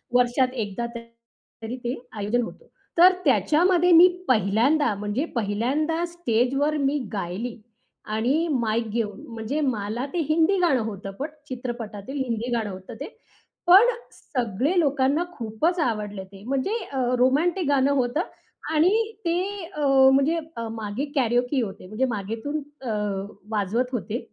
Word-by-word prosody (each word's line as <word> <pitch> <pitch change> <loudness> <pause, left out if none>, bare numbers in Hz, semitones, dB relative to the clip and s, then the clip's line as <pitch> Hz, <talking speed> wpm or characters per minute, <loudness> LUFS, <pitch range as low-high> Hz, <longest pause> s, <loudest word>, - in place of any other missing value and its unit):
वर्षात 250 +1 +3
एकदा 205 +4 -4
तरी 230 0 -10
ते 240 +2 -1 0.2
आयोजन 210 +4 0
होतं. 485 - -9 0.3
तर 360 +2 +8
त्याच्यामध्ये 330 - +4
मी 340 +2 +9 0.2
पहिल्यांदा 235 +4 +3
म्हणजे 210 +8 -2
पहिल्यांदा 260 +10 0
स्टेजवर 285 -2 0
मी 280 0 +1 0.2
गायली 205 +5 -4 0.6
आणि 270 +10 +1
माईक 230 -3 0
घेऊन. 210 -2 -3
म्हणजे 225 +6 -3
मला 235 -2 -1
ते 350 - 0
हिंदी 325 +5 +3
गाणं 315 -9 +3
होत 205 -3 -6
पट 290 - -2 0.2
चित्रपटातील 240 -1 -5
हिंदी 235 -1 -3
गाणं 225 -3 -1
होतं 185 0 -9
ते. - - -5 0.6
पण 385 +7 +8 0.2
सगळे 250 - -1
लोकांना 285 0 +2
खूपच 240 +11 -1
आवडले 210 -8 -2
ते. 195 0 -13
म्हणजे 275 - 0
अ, 270 - -4 0.2
रोमॅन्टिक 315 +7 +2
गाणं 280 -1 +3
होतं 260 +3 +1 0.5
आणि 320 +4 +4 0.3
ते 335 0 +1 0.4
अ, 300 - -4 0.3
म्हणजे 280 +5 +3 0.2
अ, 230 0 -3
मागे 220 +4 -3
कॅरओके 245 +1 +2
होते. 195 -4 -6
म्हणजे 215 +7 0
मागेतून 225 +9 -4 0.2
अ, 255 - -5 0.6
वाजवत 220 +4 0
होते. 230 0 -2
245 Hz, 135 wpm, -25 LUFS, 220-300 Hz, 0.6 s, मी